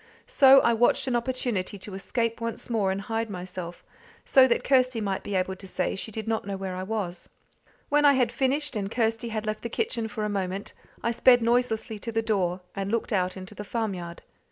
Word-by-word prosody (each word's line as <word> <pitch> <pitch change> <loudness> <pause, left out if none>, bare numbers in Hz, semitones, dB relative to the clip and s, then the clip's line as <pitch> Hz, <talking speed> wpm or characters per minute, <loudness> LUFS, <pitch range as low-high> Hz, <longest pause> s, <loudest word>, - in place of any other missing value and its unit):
So 275 - +7
I 235 - +3
watched 235 +2 +3
an 255 -2 0
opportunity 235 -5 -2
to 195 +1 -8
escape 230 +4 -2
once 230 +1 -4
more 210 -4 +1
and 195 +1 -2
hide 225 +2 -2
myself, 180 -2 -7 0.4
so 260 -1 +6
that 235 - +1
Kirsty 255 -3 +3
might 195 -3 -2
be 205 - -4
able 190 0 0
to 195 +1 -11
say 185 0 -1
she 205 +3 -5
did 220 +1 -5
not 225 -1 0
know 200 -1 -4
where 190 -1 -4
I 185 - -4
was. 190 -3 -4 0.6
When 295 +1 +3
I 285 -1 +7
had 250 -3 +2
finished, 270 +2 0
and 200 -2 -2
Kirsty 225 0 0
had 215 -1 -3
left 215 0 -3
the 235 - -4
kitchen 235 - -1
for 215 0 -4
a - - 0
moment, 195 -1 -3 0.3
I 235 - +1
sped 245 0 +5
noiselessly 230 -2 0
to 230 - -5
the 225 0 0
door, 185 -5 0
and 195 0 -3
looked 230 0 -1
out 185 -1 0
into 185 +2 -9
the 210 - -7
farmyard. 195 -6 -4
220 Hz, 215 wpm, -26 LUFS, 195-235 Hz, 0.6 s, So